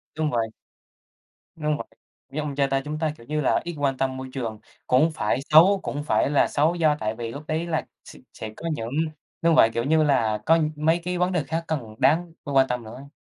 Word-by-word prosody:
Đúng 155 -1 0
vậy. 115 -3 0 1.1
Đúng 150 -1 0
v - - -9 0.5
như 150 - -2
ông 150 -2 -4
cha 140 0 +2
ta, 135 0 0
chúng 150 +1 -4
ta, 155 -1 0
kiểu 115 - -16
như 150 +3 -1
là, 140 - +2
ít 175 0 -5
quan 140 -2 0
tâm 130 0 -1
môi 130 0 -6
trường 115 -5 -4 0.3
cũng 135 +6 +4
phải 105 -5 0
xấu, 180 +6 +7
cũng 145 - -3
phải 150 - +2
là 145 - +3
xấu 155 +4 +2
do 155 -4 +2
tại 110 +1 -1
vì 115 -1 -4
lúc 140 +6 -7
đấy 160 +2 -1
là 160 -2 -2 0.2
s - - -12 0.2
sẽ 110 - -7
có 165 - -5
những 115 -7 -3 0.5
đúng 165 0 +4
vậy, 115 -7 +6
kiểu 115 - 0
như 155 +3 +3
là, 120 -8 +2
có 165 +1 +5 0.2
mấy 160 +3 +2
cái 180 0 -2
vấn 180 +1 +1
đề 175 -5 0
khác 165 +4 -3
cần 120 -9 -3
đáng 165 +3 +2
phải 145 - -5
quan 135 0 +5
tâm 125 -1 -3
nữa. 130 +6 -10
145 Hz, 235 wpm, -24 LUFS, 130-160 Hz, 1.1 s, xấu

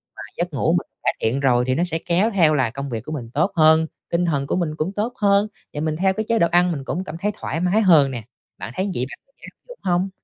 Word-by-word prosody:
mà - - -9 0.2
giấc - - -2
ngủ - - +1
mình - - 0 0.2
cải - - +2
thiện 115 +5 +1
rồi 125 -3 +3
thì 130 - +1
nó 170 - +1
sẽ 165 -2 0
kéo 185 +6 +2
theo 165 -5 +4
là 130 -5 +2
công 140 +3 -6
việc 115 -3 -4
của 155 - -7
mình 125 -7 -5
tốt 170 +8 +1
hơn, 160 0 +5 0.2
tinh 170 +1 +1
thần 140 -5 -1
của - - 0
mình 165 -4 -1
cũng 160 +4 -2
tốt 220 +4 -2
hơn, 200 0 +3 0.3
và 150 - -4
mình 155 -1 -1
theo 190 +1 +2
cái 220 +3 -3
chế 230 -1 +2
độ 170 - +4
ăn 175 +1 +4
mình 140 -4 -4
cũng 180 +7 -3
cảm 165 -4 -7
thấy 210 +1 +1
thoải 165 - -3
mái 180 +5 +2
hơn 155 -8 +5
nè. 120 -4 -5 0.3
Bạn 110 - -7
thấy 190 +4 -1
vậy 125 - 0
bạn - - -10 0.3
áp - - -65
dụng - - -11
hông? 180 +2 +1
165 Hz, 280 wpm, -22 LUFS, 140-190 Hz, 0.3 s, hơn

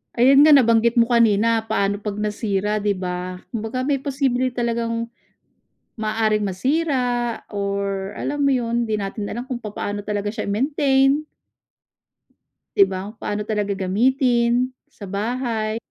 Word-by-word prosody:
Ayun 270 +4 +6
nga, 305 - +8
nabanggit 230 -2 +4
mo 235 0 +4
kanina, 225 -1 +3
paano 200 0 0
'pag 205 -1 -4
nasira, 210 -1 -1
'di 205 -1 0
ba? 180 0 -5
Kumbaga 230 +2 -3
may 275 0 0
posible 265 -2 0
talagang, 230 -1 -2 0.9
maaaring 215 -1 0
masira 245 - 0
or, 200 -1 -3
alam 290 - -3
mo 275 - +4
yun, 235 -1 0
'di 215 -2 -2
natin 200 +1 -4
alam 240 +3 -5
kung 255 - -2
papaano 205 -1 -5
talaga 205 -1 -2
siya 215 0 -4
i-maintain. 270 +5 +2 1.5
'Di 200 - +7
ba, 190 +2 -5
paano 210 -1 -4
talaga 210 -2 -1
gamitin, 240 +4 +2 0.2
sa 205 - -11
bahay. 220 +2 -2
225 Hz, 130 wpm, -22 LUFS, 205-250 Hz, 1.5 s, nga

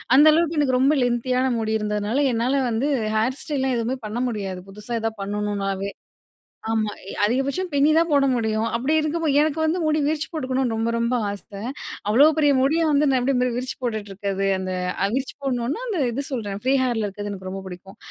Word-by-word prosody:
அந்த 290 - +7
அளவுக்கு 330 0 +1
எனக்கு 260 -3 +2
ரொம்ப 275 +4 +4
லென்த்தியான 250 +2 +1
முடி 220 0 -1
இருந்ததுனால 210 +3 -1
என்னால 240 +4 +1 0.2
வந்து 235 +6 0 0.3
ஹேர் 245 +5 +1
ஸ்டைல்லாம் 265 -4 -1
எதுவுமே 235 +3 -1
பண்ண 215 +3 -5
முடியாது 195 -5 -4
புதுசா 210 +4 -8
எதாவது 225 -1 -3
பண்ணணும்னாவே. 200 -1 -2 0.8
ஆமா. 215 -2 0 0.3
அதிகபட்சம் 270 - 0
பின்னி 285 +2 +4
தான் 335 0 +3
போட 280 -1 +4
முடியும். 220 -1 0
அப்படி 260 +7 0
இருக்கும் 315 +2 -1
போது, 295 -3 +2
எனக்கு 310 +1 0
வந்து 320 +3 +1
முடி 310 0 +2
விரிச்சி 310 0 -1
போட்டுக்கணும்னு 260 -5 -1
ரொம்ப 225 +1 0
ரொம்ப 235 +2 +1
ஆசை. 200 0 -8 0.5
அவ்ளோ 270 +8 +7
பெரிய 290 -2 +4
முடிய 310 +5 +2
வந்து 295 +1 +3
நான் 260 - +3
எப்படி 265 +2 +1
மி 250 0 +2
விரிச்சி 255 +1 -3
போட்டுட்டு 215 -4 -3
இருக்கிறது. 195 0 -2
அந்த 185 0 -3 0.4
விரிச்சி 265 0 -3
போடணும்னா 255 - -1
அந்த 390 -8 -1
இது 275 +4 -3
சொல்கிறேன் 205 -5 -4
ஃப்ரீ 260 +2 +3
ஹேர்ல 230 -4 0
இருக்கறது 205 +1 -6
எனக்கு 185 -1 -7
ரொம்ப 195 0 -6
பிடிக்கும். 185 +1 -11
245 Hz, 185 wpm, -23 LUFS, 210-280 Hz, 0.8 s, அந்த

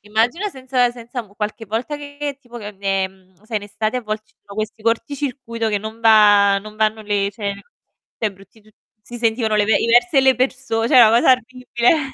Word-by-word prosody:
immagina 230 - 0
senza 255 -4 0
senza 240 +1 -7
m 200 -2 -21
qualche 215 +2 -4
volta 235 +8 -3
che 285 -1 -6
tipo 240 -2 -11
che, 210 -2 -9
ehm, 190 -1 -3
sai 220 0 -4
in 205 - -3
estate 215 +3 -3
a - - -8
volte 215 0 -4
ci - - -33
sono 200 - -12
questi 215 0 -4
corticircuito 230 0 -2
che 210 -1 0
non 220 +2 -8
va 205 -3 +6
non 215 +1 -12
vanno 220 0 +1
le 205 -1 0
cioè, 205 -2 -4 0.6
cioè 215 -3 -1
brutti 195 +3 -20
tu 215 - -24 0.3
si 240 +3 -10
sentivano 225 -1 0
le 210 - +3
ve 205 -1 +3
i - - 0
versi 245 +8 +3
delle 265 -1 +5
perso 255 -3 -1
cioè - - +4
una 225 - +8
cosa 235 +3 +4
orribile. 255 +3 0
225 Hz, 205 wpm, -20 LUFS, 210-250 Hz, 0.6 s, una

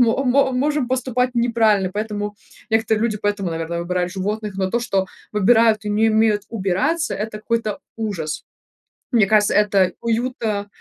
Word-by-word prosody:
мо 245 +3 +3
мо 265 +2 +3
можем 285 0 0
поступать 255 -1 0
неправильно. 225 -5 +2
Поэтому 210 -1 -3 0.4
некоторые 220 -1 +2
люди, 215 -3 0
поэтому, 205 -3 -1
наверное, 165 +1 -3
выбирают 180 0 -1
животных. 205 +1 -3
Но 190 -1 -1
то, 235 - 0
что 195 -5 0 0.3
выбирают 220 +1 +4
и 210 - -2
не 220 +2 +3
умеют 215 -2 +2
убираться,- 230 - 0
это 215 +1 -4
какой-то 215 -1 -2 0.2
ужас. 190 -9 -4 0.7
Мне 230 -4 +4
кажется, 210 -1 +3
это 200 -3 +3
уюта, 230 -3 -1
215 Hz, 150 wpm, -21 LUFS, 200-235 Hz, 0.7 s, выбирают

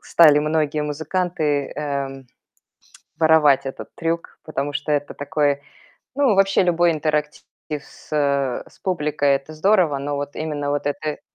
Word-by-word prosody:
стали 155 -3 +6
многие 150 0 0
музыканты, 150 -1 -1
эм, 140 -2 -4 0.9
воровать 155 -4 +5
этот 135 - -6
трюк, 165 0 -3
потому 145 -2 -3
что 145 +1 -2
это 145 -1 -1
такой, 145 -1 0 0.5
ну, 270 -6 +3
вообще 195 0 +4
любой 175 -1 +3
интерактив 150 -1 -1 0.4
с, - - -18
э, 140 -3 +1
с - - -23
публикой- 150 -5 0
это 135 +3 -4
здорово. 170 -3 +3
Но 145 +1 -3
вот 145 0 -5
именно 150 -2 -3
вот 145 0 -2
это 145 0 -1
э 150 - -4
150 Hz, 145 wpm, -22 LUFS, 145-160 Hz, 0.9 s, стали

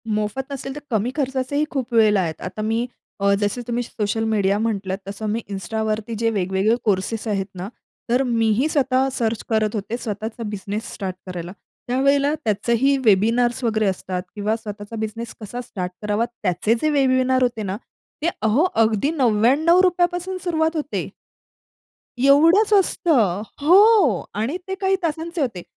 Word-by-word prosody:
मोफत 215 +6 -2
नसेल, 270 -1 -5
तर - - -5
कमी 220 +2 0
खर्चाचेही 270 +1 0
खूप 260 -3 -3
वेळेला 215 -3 +5
आहेत. 160 -3 -4
आता 185 +4 -5
मी 225 +3 0 0.4
अ, 200 0 +4
जसे 205 +4 -1
तुम्ही 240 0 -1
सोशल 225 -1 -2
मीडिया 205 -3 +1
म्हटलात, 200 -4 -1
तसं 200 +2 -6
मी 220 +2 0
Instaवरती 215 +3 -3
जे 230 0 +2
वेगवेगळे 190 +4 +1
कोर्सेस 210 +2 -1
आहेत 195 -3 0
ना, 185 +1 -5 0.4
तर 250 +3 +3
मीही 230 +2 +2
स्वतः 265 -3 +2
सर्च 225 -1 -1
करत 220 -1 +1
होते 215 +3 -3
स्वतःचा 220 0 -5
बिझनेस 205 +3 -5
स्टार्ट 190 -3 -4
करायला. 175 -1 -6 0.4
त्यावेळेला 275 +3 +2
त्याचेही 235 +6 +2
वेबिनार्स 230 +5 +3
वगैरे 220 -2 +1
असतात 185 -1 -3
किंवा 210 +1 0
स्वतःचा 210 -1 -8
बिझनेस 220 +1 -5
कसा 230 +4 -5
स्टार्ट 185 -7 -5
करावा 210 +2 0
त्याचे 215 -2 -1
जे 310 - +2
वेबिनार 260 -2 +2
होते 240 -3 -1
ना 195 0 -3 0.5
ते 335 - +3
अहो, 220 +8 +3
अगदी 225 +4 +2
₹99 315 - +3
पासून 360 +1 -4
सुरुवात 320 -2 0
होते. 300 -2 -3 1.1
एवढंच 330 - +5
असतं. 290 - +2 0.2
हो 365 - +5
आणि 230 - -1
ते 380 - -3
काही 385 0 +3
तासांचे 330 +1 -2
होते. 225 -10 -2
230 Hz, 150 wpm, -22 LUFS, 210-275 Hz, 1.1 s, वेळेला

